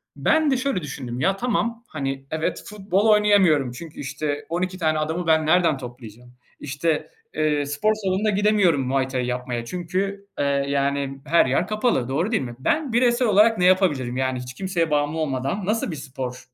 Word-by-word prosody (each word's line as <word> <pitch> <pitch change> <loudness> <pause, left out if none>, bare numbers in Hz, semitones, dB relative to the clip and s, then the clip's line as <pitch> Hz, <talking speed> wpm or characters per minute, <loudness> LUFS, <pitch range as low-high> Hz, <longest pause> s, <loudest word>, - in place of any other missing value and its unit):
Ben 315 -2 +2
de 265 - +2
şöyle 260 -7 -1
düşündüm: 130 -5 -6
"Ya, 190 +7 +1
tamam, 235 0 -1
hani, 135 -4 -4
evet, 160 0 -2
futbol 200 -1 -1
oynayamıyorum 200 - +4
çünkü, 155 +5 -10
işte, 145 +1 -3
12 180 +2 -2
tane 155 -3 +1
adamı 160 +3 -2
ben 160 -1 +3
nereden 165 -2 +3
toplayacağım? 120 -1 -11 0.3
İşte, 150 +2 -2 0.2
eee, 150 -2 +1
spor 145 +10 +1
salonuna 205 0 -1
gidemiyorum 205 -7 +3
Muay 135 0 +1
Thai 130 -2 -2
yapmaya 125 -1 -3
çünkü, 190 +6 -3
eee, 145 - +1 0.2
yani 140 -1 -1
her 165 +3 +4
yer 135 +7 +1
kapalı, 215 - 0
doğru 165 +11 0
değil 220 - +1
mi? 120 -2 -7
Ben 285 - 0
bireysel 240 0 +3
olarak 215 +2 +5
ne 180 - +2
yapabilirim? 150 -10 +2
Yani 130 -1 -1
hiç 125 0 -8
kimseye 170 0 -1
bağımlı 145 +1 +1
olmadan 145 +5 -2
nasıl 215 0 -1
bir - - -4
sporla 130 -3 -6
160 Hz, 175 wpm, -23 LUFS, 135-200 Hz, 0.3 s, olarak